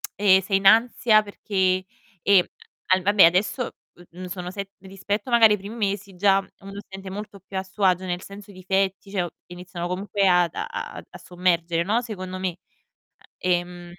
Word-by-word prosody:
ehm, 190 -2 +5
sei 195 +1 +1
in 195 - -6
ansia 220 0 +5
perché, 190 -2 -1 0.4
ehm, 195 -3 +5 0.4
al 185 0 +3
vabbè 205 0 +5
adesso, 190 +8 +2 0.4
mhmm, 185 +2 -9
sono 180 0 -6
set 195 0 -6
rispetto 195 +4 -4
magari 225 -3 +6
ai - - 0
primi 205 +4 -8
mesi, 200 -3 -3
già 195 +1 +4 0.2
uno 195 0 -11
si 205 - -9
sente 190 0 -8
molto 200 0 -8
più 190 +1 -8
a 190 - -1
suo 195 +2 -7
agio 185 0 +2
nel 175 0 -3
senso 200 0 -11
i - - -16
difetti, 190 +1 -1
cioè, 185 -3 -1 0.2
iniziano 175 -1 -7
comunque 195 +2 0
ad 180 -2 +3
a - - -3
a - - -6
a - - -8
a - - -11
sommergere, 175 -2 0
no, 220 +6 +1
secondo 185 -5 -6
me. 180 -2 -3 0.8
Ehm, 175 -1 -2
190 Hz, 185 wpm, -24 LUFS, 180-205 Hz, 0.8 s, magari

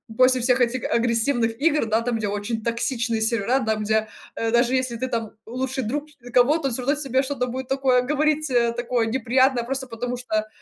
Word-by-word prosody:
после 255 0 +4
всех 250 +1 +2
этих 245 0 +1
агрессивных 230 0 +1
игр, 300 -4 +2
да, 220 +1 +1
там, 235 -1 -1
где 210 -2 -2
очень 205 +2 -3
токсичные 230 -1 -1
сервера, 230 +3 +1
там, 215 -1 0
где, 220 +1 +1 0.3
э, 225 0 -1
даже 240 +2 +3
если 255 -2 -1
ты 260 +3 -3
там 230 -3 -3 0.2
лучший 260 +2 -3
друг 290 +7 -2 0.3
кого-то, 275 +4 +4
он 250 - -2
всё 255 - -2
равно 285 +3 +2
тебе 270 -2 0
что-то 260 -2 -2
будет 255 +1 -5
такое 265 -2 +2
говорить, 305 +2 +1 0.3
такое 240 -1 0
неприятное, 255 +1 +2
просто 260 +1 -4
потому 245 +1 -4
что, 215 -3 -2
245 Hz, 190 wpm, -23 LUFS, 230-265 Hz, 0.3 s, после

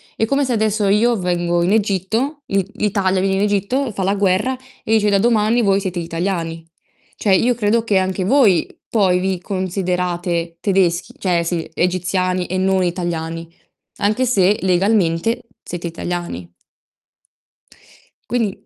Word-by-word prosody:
È 225 - +1
come 275 +4 +1
se 250 - -1
adesso 215 -2 +1
io 230 +4 +3
vengo 175 -1 0
in 180 - +1
Egitto, 220 - 0
l'I 195 -2 0
l'Italia 195 -2 +1
viene 195 0 +1
in - - 0
Egitto, 210 +6 0
fa 195 -2 -3
la 195 +2 +1
guerra 200 +6 +1 0.3
e 220 - 0
dice: 210 -1 +3
"Da 200 - +3
domani 225 +1 +3
voi 195 -2 +3
siete 185 -2 -3
italiani." 165 -1 -3 0.5
Cioè 200 - +2
io 245 +5 +3
credo 225 0 +1
che 210 -4 +1
anche 185 0 -1
voi 205 - +4 0.2
poi 190 -5 +2
vi 190 0 -1
considerate 180 -2 -2
tedeschi 185 -4 +1
cioè, 175 -3 +1
sì, 170 -1 -3
egiziani 180 0 0
e 185 - -2
non 190 0 +2
italiani, 170 -2 -3 0.5
anche 215 +6 +1
se 205 -4 +3
legalmente 190 +1 +1 0.2
siete 175 0 -5
italiani. 170 - -5 1.8
Quindi 230 -5 -1
190 Hz, 145 wpm, -19 LUFS, 175-210 Hz, 1.8 s, voi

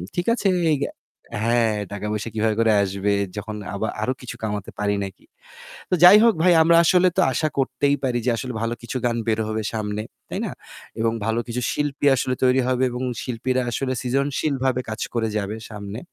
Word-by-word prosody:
ঠিক 175 - -1
আছে 200 - +1 0.2
এই - - +1 0.7
হ্যাঁ 115 -2 +2 0.2
টাকা-পয়সা 105 +2 -3
কিভাবে 110 -1 +1
করে 115 -1 +4
আসবে? 100 +1 -1 0.3
যখন 105 +1 -5 0.2
আবা 110 +2 -2
আরো 130 +4 0
কিছু 125 - -7
কামাতে 105 -2 -3
পারি 100 0 +1
নাকি? 95 -1 -9 0.6
তো - - -1
যাই 190 +4 +10
হোক 230 -2 +6
ভাই 180 -1 +6
আমরা 170 +1 +5
আসলে 180 +2 +4
তো - - +5
আশা 155 - +1
করতেই 140 +1 +1
পারি 125 -2 0
যে 125 - +3
আসলে 125 +1 -4
ভালো 115 +1 -1
কিছু 120 +2 -4
গান 120 -1 +1
বের 110 0 +1
হবে 110 0 -2
সামনে। 105 -1 -2 0.3
তাই - - -3
না? - - -4 0.5
এবং 115 0 +1
ভালো 115 +1 0
কিছু 120 +1 -3
শিল্পী 145 -1 -2
আসলে 130 0 -1
তৈরি 130 +1 +4
হবে 130 0 +1
এবং 125 +1 -5 0.2
শিল্পীরা 130 +1 -1
আসলে 130 +1 -1
সৃজনশীলভাবে 135 0 0
কাজ 110 - -5
করে 115 -1 0
যাবে 105 +1 -3
সামনে। 105 +1 -7
120 Hz, 185 wpm, -23 LUFS, 110-130 Hz, 0.7 s, যাই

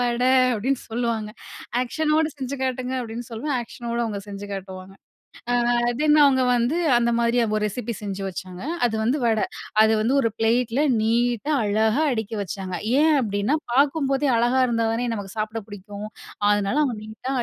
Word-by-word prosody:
"வடை" 245 +1 +1 0.3
அப்படின்னு 255 +5 -1
சொல்லுவாங்க." 225 -2 -2 0.5
ஆக்ஷனோடு 310 +4 +1
செஞ்சு 275 0 -4
காட்டுங்க." 255 0 -2
அப்படின்னு 235 0 -6
சொல்லுவேன். 255 +5 -3
ஆக்ஷனோட 235 0 -6
அவங்க 210 -3 -3
செஞ்சு 200 0 -7
காட்டுவாங்க. 190 -1 -7 0.8
அ - - +2 0.2
தென், 305 0 +4
அவுங்க 260 -2 +4
வந்து 245 +8 +1 0.2
அந்த 235 0 +1
மாரி 235 +1 +2 0.2
ஒரு 210 - -1
ரெசிபி 235 +3 -4
செஞ்சு 200 -1 -4
வச்சாங்க. 185 +1 -7 0.2
அது 225 - -2
வந்து 265 +5 +1
வடை. 220 -2 +2 0.4
அது 220 - +3
வந்து 245 +5 +1
ஒரு 230 - +1
ப்ளேட்ல 235 +4 +1 0.2
நீட்டா, 240 +5 +1
அழகா 220 +8 +2
அடுக்கி 220 -1 -3
வச்சாங்க. 185 0 -5 0.3
ஏன் 315 -1 +4
அப்படின்னா 205 +6 0 0.2
பாக்கும்போதே 275 0 +2
அழகா 245 +2 +2
இருந்தா 230 -1 +1
தானே 240 +1 -1
நமக்கு 205 0 -7
சாப்பிட 215 +1 -3
பிடிக்கும். 205 +1 -8 0.4
அதனால, 205 +5 +1
அவங்க 245 -5 -2
நீட்டா 220 +5 -6
235 Hz, 155 wpm, -23 LUFS, 210-260 Hz, 0.8 s, தென்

